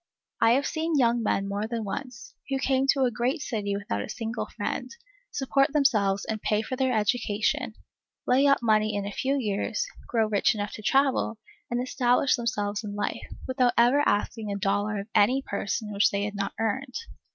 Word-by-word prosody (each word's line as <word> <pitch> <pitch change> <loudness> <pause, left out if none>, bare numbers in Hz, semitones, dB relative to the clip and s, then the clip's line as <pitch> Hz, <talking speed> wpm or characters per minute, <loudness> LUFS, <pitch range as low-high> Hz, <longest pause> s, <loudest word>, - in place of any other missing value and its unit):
I 225 - +6
have 275 +3 +2
seen 320 -1 -1
young 235 -2 +3
men 195 -2 0
more 200 +2 -2
than 230 -1 -3
once, 240 +3 -6 0.2
who 270 - 0
came 265 0 +1
to 270 0 +3
a 250 - +2
great 245 +6 -1
city 205 -6 -2
without 200 - -3
a - - -6
single 225 0 -4
friend, - - -4 0.4
support 275 +1 +1
themselves 210 -10 +2
and 220 -1 -3
pay 210 0 +1
for 255 - -4
their 260 0 +1
education, 215 -1 0 0.5
lay 265 +3 +4
up 275 -3 +3
money 215 -1 +2
in 200 -1 -2
a 205 - -4
few 270 +6 0
years, 225 - -1 0.2
grow 225 -2 +2
rich 215 +2 +2
enough 205 0 -3
to - - -8
travel, 265 -1 +2 0.3
and 240 +1 -1
establish 250 +1 +2
themselves 210 -3 -2
in 205 -1 -5
life, 205 0 -3 0.2
without 255 -2 +2
ever 245 +5 +5
asking 210 +1 0
a 200 - -2
dollar 205 +1 0
of 200 - -11
any 255 +6 +4
person 210 +1 -3
which 200 0 +4
they 200 0 -1
had 205 0 -3
not 200 -1 -3
earned. 250 +4 -2
225 Hz, 190 wpm, -27 LUFS, 205-260 Hz, 0.5 s, I